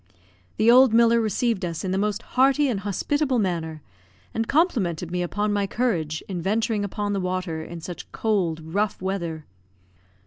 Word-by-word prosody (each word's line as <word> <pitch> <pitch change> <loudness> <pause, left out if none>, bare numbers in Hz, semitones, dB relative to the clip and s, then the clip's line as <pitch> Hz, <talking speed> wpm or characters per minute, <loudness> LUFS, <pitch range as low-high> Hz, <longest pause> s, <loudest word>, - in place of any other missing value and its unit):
The 225 +2 +5
old 250 -2 +6
miller 235 0 +5
received 220 -1 0
us 170 -2 -3
in 185 - -2
the 190 - 0
most 210 +2 -1
hearty 275 +3 +4
and 230 -7 -1
hospitable 260 +8 0
manner; 165 -7 -2 0.5
and 225 0 -1
complimented 195 - +1
me 180 0 -1
upon 205 +4 -1
my 200 -1 0
courage 170 -11 -1
in 180 -3 -4
venturing 215 +3 0
upon 205 +1 -2
the 200 - 0
water 180 -3 -2
in 170 +1 -8
such 175 +1 -8
cold, 185 -8 0
rough 205 0 0
weather. 170 -5 -3
200 Hz, 165 wpm, -24 LUFS, 175-230 Hz, 0.5 s, old